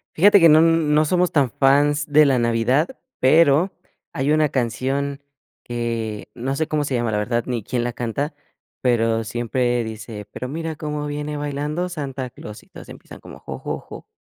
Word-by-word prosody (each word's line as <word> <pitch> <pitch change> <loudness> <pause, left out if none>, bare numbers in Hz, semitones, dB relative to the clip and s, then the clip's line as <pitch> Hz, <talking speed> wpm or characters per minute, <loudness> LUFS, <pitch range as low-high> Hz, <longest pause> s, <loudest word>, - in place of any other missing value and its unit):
Fíjate 200 +4 +6
que 165 -2 +7
no, 155 +1 +7
n 165 -2 +3
no 155 +1 +4
somos 180 +3 +1
tan 140 -6 +2
fans 145 +3 +3
de 150 +1 +6
la 135 -3 +3
navidad, 120 +6 +2 0.3
pero 155 +6 +4 0.4
hay 135 +2 0
una 155 -1 +3
canción 135 +3 -2 0.4
que 115 -3 -4
no 130 +3 -3
sé 160 +2 -1
cómo 150 -2 0
se 135 - -2
llama, 120 -2 0
la 105 - 0
verdad, 115 +3 -1
ni 120 -4 -3
quién 120 +2 -2
la 120 - -2
canta, 125 +6 -3 0.5
pero 115 -2 +1
siempre 120 +2 -1
dice: 110 -1 -7
"Pero 125 - -6
mira 160 +3 -4
cómo 150 -1 -4
viene 150 0 -4
bailando 150 +4 -3
Santa 140 -6 -5
Claus", 105 -2 -11
y - - -24
todos - - -12
empiezan - - -12
como: - - -12
jo, - - -8
jo, - - -4
jo. - - -12
135 Hz, 185 wpm, -21 LUFS, 120-150 Hz, 0.5 s, que